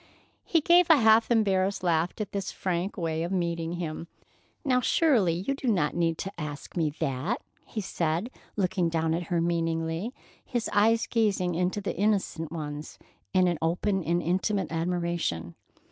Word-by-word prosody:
He 330 Hz, -, +2 dB
gave 350 Hz, +2 st, +5 dB
a 320 Hz, -, +8 dB
half 225 Hz, -2 st, +5 dB
embarrassed 200 Hz, -4 st, +2 dB
laugh 170 Hz, -1 st, +2 dB
at 210 Hz, -2 st, -3 dB
this 195 Hz, -1 st, -3 dB
frank 185 Hz, +2 st, -2 dB
way 165 Hz, -2 st, -1 dB
of 170 Hz, +2 st, -2 dB
meeting 170 Hz, -2 st, -1 dB
him. 170 Hz, -1 st, -4 dB, 0.6 s
"Now, 250 Hz, -2 st, +3 dB
surely, 245 Hz, -, +3 dB
you 275 Hz, -, +2 dB
do 275 Hz, -1 st, -5 dB
not 180 Hz, -10 st, +2 dB
need 165 Hz, -1 st, +1 dB
to 195 Hz, -, -5 dB
ask 145 Hz, -1 st, -7 dB
me 165 Hz, -3 st, +1 dB
that," 145 Hz, -, -1 dB, 0.3 s
he 215 Hz, -, -4 dB
said, 175 Hz, +4 st, -1 dB, 0.2 s
looking 185 Hz, -3 st, +1 dB
down 160 Hz, -1 st, 0 dB
at 170 Hz, 0 st, -2 dB
her 175 Hz, -2 st, +1 dB
meaningly, 165 Hz, +3 st, -1 dB, 0.3 s
his 240 Hz, -3 st, -2 dB
eyes 225 Hz, +3 st, +4 dB
gazing 200 Hz, -6 st, +1 dB
into 180 Hz, +4 st, 0 dB
the 195 Hz, -, -3 dB
innocent 195 Hz, -5 st, 0 dB
ones 150 Hz, -2 st, -6 dB, 0.3 s
in 180 Hz, -3 st, +2 dB
open 180 Hz, +4 st, 0 dB
and 170 Hz, +2 st, 0 dB
intimate 190 Hz, +3 st, 0 dB
admiration. 170 Hz, -, -1 dB
175 Hz, 160 wpm, -28 LUFS, 165-205 Hz, 0.6 s, a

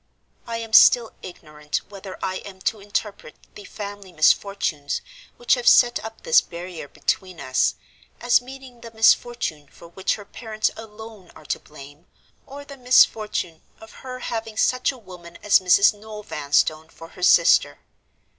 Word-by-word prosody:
I 230 Hz, -1 st, -4 dB
am 225 Hz, -1 st, -8 dB
still 235 Hz, 0 st, +6 dB
ignorant 150 Hz, -4 st, -6 dB
whether 195 Hz, -2 st, -10 dB
I 185 Hz, 0 st, -3 dB
am 190 Hz, -1 st, -11 dB
to 220 Hz, +2 st, -2 dB
interpret 200 Hz, -4 st, -5 dB, 0.2 s
the 205 Hz, -, -12 dB
'family 205 Hz, -2 st, -9 dB
misfortunes' 155 Hz, -2 st, 0 dB, 0.4 s
which 240 Hz, -, +1 dB
have 245 Hz, -2 st, -1 dB
set 240 Hz, -1 st, +5 dB
up 220 Hz, -, -10 dB
this 485 Hz, 0 st, +5 dB
barrier 170 Hz, -3 st, -9 dB
between 185 Hz, +4 st, -3 dB
us, 130 Hz, -2 st, 0 dB, 0.4 s
as 245 Hz, 0 st, +3 dB
meaning 255 Hz, -1 st, -13 dB
the 230 Hz, -, -10 dB
misfortune 225 Hz, -8 st, +1 dB
for 170 Hz, +5 st, -16 dB
which 190 Hz, +3 st, -2 dB
her 205 Hz, -, -12 dB
parents 215 Hz, 0 st, -3 dB
alone 220 Hz, -3 st, -12 dB
are 155 Hz, -, -16 dB
to -, -, -3 dB
blame, 145 Hz, +2 st, -15 dB, 0.4 s
or 285 Hz, +1 st, -10 dB
the 280 Hz, -1 st, -12 dB
misfortune 215 Hz, -9 st, +2 dB, 0.2 s
of 220 Hz, -, -14 dB
her 255 Hz, -1 st, -7 dB
having 225 Hz, -1 st, -5 dB
such 255 Hz, +3 st, +1 dB
a 265 Hz, -, -13 dB
woman 180 Hz, -6 st, -13 dB
as 210 Hz, -, +5 dB
Mrs. 185 Hz, +3 st, +4 dB
Noel 210 Hz, 0 st, -11 dB
Vanstone 155 Hz, 0 st, -1 dB
for 165 Hz, 0 st, -13 dB
her 180 Hz, -, -15 dB
sister. 170 Hz, -1 st, +4 dB
205 Hz, 155 wpm, -22 LUFS, 170-230 Hz, 0.4 s, still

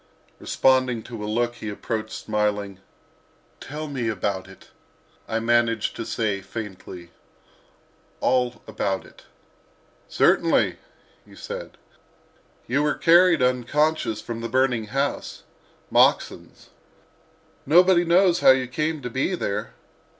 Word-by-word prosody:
Responding 130 Hz, -3 st, +1 dB
to 115 Hz, -3 st, -8 dB
a 105 Hz, -, -4 dB
look 120 Hz, +2 st, -1 dB
he 110 Hz, -, -6 dB
approached, 110 Hz, +1 st, -4 dB
smiling. 105 Hz, -2 st, -2 dB, 0.8 s
"Tell 155 Hz, +2 st, -7 dB
me 130 Hz, -6 st, -3 dB
about 95 Hz, -2 st, -3 dB
it," 95 Hz, -, -16 dB, 0.6 s
I 115 Hz, -, -1 dB
managed 115 Hz, -1 st, +1 dB
to 115 Hz, -, -6 dB
say, 105 Hz, -4 st, -1 dB
faintly—"all 105 Hz, -, -6 dB
about 100 Hz, -3 st, -3 dB
it." -, -, -18 dB, 0.8 s
"Certainly," -, -, +2 dB, 0.5 s
he -, -, -18 dB
said; -, -, -8 dB, 0.9 s
"you 135 Hz, +4 st, 0 dB
were 150 Hz, 0 st, +1 dB
carried 170 Hz, -3 st, +5 dB
unconscious 125 Hz, -1 st, 0 dB
from 115 Hz, +1 st, -6 dB
a 115 Hz, -, -3 dB
burning 125 Hz, -2 st, +1 dB
house—Moxon's. 135 Hz, +6 st, -2 dB, 1.0 s
Nobody 175 Hz, +3 st, +5 dB
knows 175 Hz, +1 st, +3 dB
how -, -, +5 dB
you 130 Hz, -1 st, +5 dB
came 150 Hz, +3 st, -2 dB
to 125 Hz, -, -4 dB
be 135 Hz, +9 st, -1 dB
there. 100 Hz, -, -4 dB
120 Hz, 110 wpm, -24 LUFS, 105-140 Hz, 1.0 s, carried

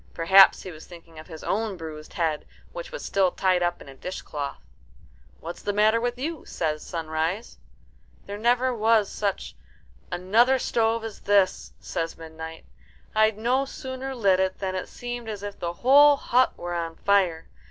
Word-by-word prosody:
Perhaps 190 Hz, +4 st, +6 dB
he 185 Hz, -, -7 dB
was 155 Hz, -1 st, -12 dB
thinking 165 Hz, -2 st, -13 dB
of 155 Hz, -, -12 dB
his 160 Hz, -3 st, -10 dB
own 215 Hz, -2 st, -1 dB
bruised 155 Hz, -2 st, -9 dB
head, 160 Hz, -3 st, -1 dB, 0.2 s
which -, -, -7 dB
was -, -, -6 dB
still 195 Hz, -2 st, +2 dB
tied 185 Hz, 0 st, +1 dB
up 175 Hz, 0 st, -1 dB
in -, -, -18 dB
a 135 Hz, -, -10 dB
dishcloth. 145 Hz, -3 st, -6 dB, 0.8 s
"What's 170 Hz, +1 st, -8 dB
the 205 Hz, -, -2 dB
matter 215 Hz, +2 st, +3 dB
with 245 Hz, 0 st, -2 dB
you?" 310 Hz, +3 st, -4 dB
says 155 Hz, -2 st, -3 dB
Sunrise. 165 Hz, +5 st, -3 dB, 0.7 s
"There 200 Hz, +1 st, -6 dB
never 245 Hz, +3 st, +2 dB
was 220 Hz, -2 st, +2 dB
such 200 Hz, -2 st, -3 dB, 0.6 s
another 225 Hz, +9 st, +3 dB
stove 230 Hz, -2 st, 0 dB
as 225 Hz, -2 st, -7 dB
this," 200 Hz, -2 st, +2 dB
says 165 Hz, 0 st, -4 dB
Midnight. 160 Hz, 0 st, -9 dB, 0.5 s
"I'd 215 Hz, -1 st, +3 dB
no 245 Hz, +5 st, +1 dB
sooner 265 Hz, -1 st, -6 dB
lit 195 Hz, -6 st, +3 dB
it 190 Hz, 0 st, 0 dB
than 190 Hz, -1 st, -3 dB
it 185 Hz, -, -4 dB
seemed 240 Hz, -1 st, -6 dB
as 205 Hz, -2 st, -6 dB
if 205 Hz, -1 st, -7 dB
the 170 Hz, 0 st, -3 dB
whole 285 Hz, +2 st, +7 dB
hut 255 Hz, 0 st, +2 dB
were 175 Hz, 0 st, -5 dB
on 165 Hz, -1 st, -3 dB
fire. 185 Hz, -5 st, +1 dB
200 Hz, 170 wpm, -25 LUFS, 170-235 Hz, 0.8 s, whole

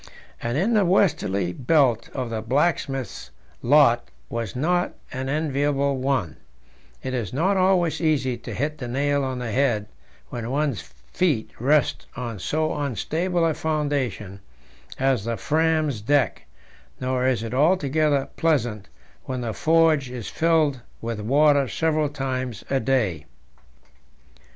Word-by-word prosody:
And 120 Hz, +3 st, -1 dB
in 200 Hz, +9 st, +1 dB
the 210 Hz, -2 st, +4 dB
westerly 150 Hz, -, +1 dB
belt 130 Hz, -, +2 dB
the 115 Hz, -4 st, -3 dB
blacksmith's 135 Hz, +1 st, -1 dB, 0.3 s
lot 125 Hz, -, +4 dB, 0.2 s
was 115 Hz, -3 st, -4 dB
not 175 Hz, +7 st, 0 dB, 0.2 s
an 130 Hz, +1 st, -3 dB
enviable 140 Hz, -1 st, 0 dB
one; 130 Hz, -, -1 dB, 0.7 s
it 130 Hz, -, -3 dB
is 120 Hz, -6 st, -2 dB
not 180 Hz, +9 st, +1 dB
always 185 Hz, -4 st, +2 dB
easy 145 Hz, -6 st, +1 dB
to 120 Hz, -2 st, -8 dB
hit 150 Hz, +7 st, -2 dB
the 125 Hz, -, -5 dB
nail 140 Hz, +3 st, 0 dB
on 130 Hz, -1 st, -2 dB
the 120 Hz, -2 st, -4 dB
head 120 Hz, -4 st, +1 dB, 0.4 s
when 120 Hz, -1 st, -5 dB
one's 140 Hz, -3 st, 0 dB
feet 110 Hz, -, -2 dB
rest 145 Hz, +4 st, +2 dB
on 120 Hz, -5 st, -5 dB
so 155 Hz, -, -1 dB
unstable 160 Hz, -, -1 dB
a 160 Hz, -, +2 dB
foundation 140 Hz, -11 st, -2 dB, 0.6 s
as 130 Hz, -5 st, +1 dB
the 115 Hz, 0 st, -2 dB
Fram's 155 Hz, -6 st, +1 dB
deck, 135 Hz, 0 st, +1 dB, 0.5 s
nor 130 Hz, 0 st, 0 dB
is 125 Hz, -4 st, +1 dB
it 115 Hz, +1 st, -5 dB
altogether 150 Hz, -1 st, +2 dB
pleasant 120 Hz, -11 st, 0 dB, 0.4 s
when 130 Hz, -1 st, -3 dB
the 115 Hz, -2 st, -3 dB
forge 160 Hz, -3 st, +3 dB
is 125 Hz, -4 st, -6 dB
filled 160 Hz, -5 st, +2 dB, 0.2 s
with 115 Hz, -1 st, -4 dB
water 140 Hz, +5 st, +3 dB
several 155 Hz, -1 st, 0 dB
times 130 Hz, -5 st, -4 dB
a 135 Hz, -, +2 dB
day. 110 Hz, -, 0 dB
135 Hz, 130 wpm, -24 LUFS, 120-155 Hz, 0.7 s, the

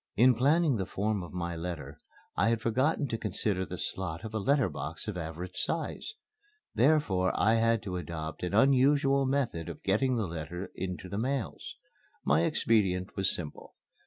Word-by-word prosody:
In 125 Hz, +4 st, +6 dB
planning 145 Hz, +3 st, +3 dB
the 95 Hz, -, -2 dB
form 105 Hz, 0 st, -1 dB
of 85 Hz, -, -8 dB
my 85 Hz, -1 st, -3 dB
letter 80 Hz, -4 st, -6 dB, 0.4 s
I 100 Hz, +5 st, +3 dB
had 115 Hz, -1 st, +1 dB
forgotten 130 Hz, +6 st, +1 dB
to 115 Hz, -, -2 dB
consider 95 Hz, -2 st, -1 dB
the -, -, -6 dB
slot 95 Hz, -1 st, -3 dB
of 110 Hz, -, -7 dB
a 110 Hz, -, 0 dB
letter 135 Hz, +3 st, +3 dB
box 75 Hz, +2 st, -6 dB
of 105 Hz, -, -3 dB
average 85 Hz, +2 st, -6 dB
size. 165 Hz, -, -3 dB, 0.6 s
Therefore 120 Hz, -11 st, +3 dB
I 110 Hz, +2 st, +4 dB
had 115 Hz, 0 st, +2 dB
to 95 Hz, -3 st, -3 dB
adopt 80 Hz, -2 st, -5 dB
an 90 Hz, +2 st, -2 dB
unusual 135 Hz, +2 st, +4 dB
method 130 Hz, -, -1 dB
of -, -, -9 dB
getting 125 Hz, +7 st, +2 dB
the 110 Hz, -3 st, 0 dB
letter 85 Hz, +2 st, -6 dB
into 90 Hz, -2 st, -5 dB
the 100 Hz, +3 st, -3 dB
mails. 130 Hz, +1 st, -3 dB, 0.5 s
My 80 Hz, +4 st, +4 dB
expedient 95 Hz, -4 st, +1 dB
was 95 Hz, -1 st, +2 dB
simple. 80 Hz, -4 st, -8 dB
100 Hz, 170 wpm, -30 LUFS, 90-130 Hz, 0.6 s, In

